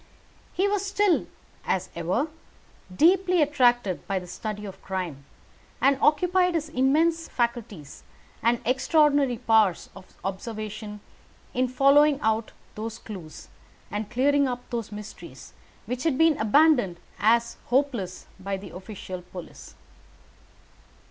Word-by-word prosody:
He 385 +2 +1
was 405 -1 0
still, 400 -2 +1 0.4
as 185 0 -1
ever, 180 - 0 0.7
deeply 365 - +4
attracted 245 - +2
by 195 - 0
the 180 - -4
study 210 +3 -6
of 195 -1 -9
crime, 175 -8 -5 0.5
and 275 0 +3
occupied 360 +3 +3
his 315 -1 -1
immense 320 +5 +2
faculties 230 - -3 0.4
and 235 +1 +2
extraordinary 280 0 +3
powers 220 -6 +2
of 190 -1 -12 0.2
observation 210 +1 -5 0.5
in 255 +1 +1
following 275 +3 +4
out 220 0 0 0.2
those 220 +1 -5
clews, 180 -8 -10 0.4
and 210 0 -3
clearing 280 +3 +2
up 245 -1 -5
those 230 -3 -3
mysteries, 210 0 -10 0.3
which 250 +1 -4
had 300 -4 +1
been 325 0 +5
abandoned 240 - +4 0.2
as 235 +2 +2
hopeless 245 -8 -1
by 195 +1 -3
the 190 -2 -10
official 185 -1 -7
police. 180 -1 -11
235 Hz, 120 wpm, -26 LUFS, 200-290 Hz, 0.7 s, been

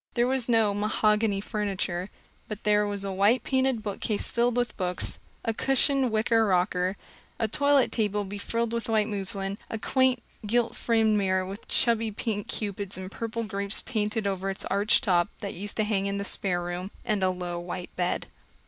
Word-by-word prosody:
There 240 -1 +3
was 255 -1 0
no 225 -3 +4
"mahogany 210 0 +2
furniture," 195 -4 -2 0.4
but 215 -1 -6
there 210 0 +3
was 200 -1 -2
a 195 - -2
white 205 +6 +3
painted 260 -4 +1
bookcase 205 0 -1
filled 240 0 +1
with 245 0 0
books, 180 -2 -3 0.3
a 225 - +1
cushioned 270 +2 +2
wicker 225 +1 +3
rocker, 185 -1 +1 0.4
a 225 - +1
toilet 285 +3 +3
table 210 -2 0
befrilled 220 +4 -2
with 230 0 -2
white 215 -1 +3
muslin, 195 -1 -2
a 225 - -3
quaint, 260 +1 +2 0.2
gilt 235 +2 +1
framed 220 -2 +2
mirror 185 -1 +1
with 195 +4 -8
chubby 230 -2 +2
pink 210 -1 -3
Cupids 200 -2 -3
and 185 0 -6
purple 230 +1 -3
grapes 200 -1 -3
painted 215 -3 -1
over 195 -1 -1
its 195 - -3
arched 205 +5 +3
top, 180 -5 +3
that 200 -2 -3
used 205 +3 -3
to 215 - +3
hang 200 -2 0
in 200 0 -1
the 200 - -3
spare 180 -3 0
room, 175 +2 -4 0.2
and 210 -3 0
a 185 - +3
low 180 -1 -3
white 175 +1 -6
bed. 180 -1 -1
210 Hz, 180 wpm, -27 LUFS, 195-230 Hz, 0.4 s, no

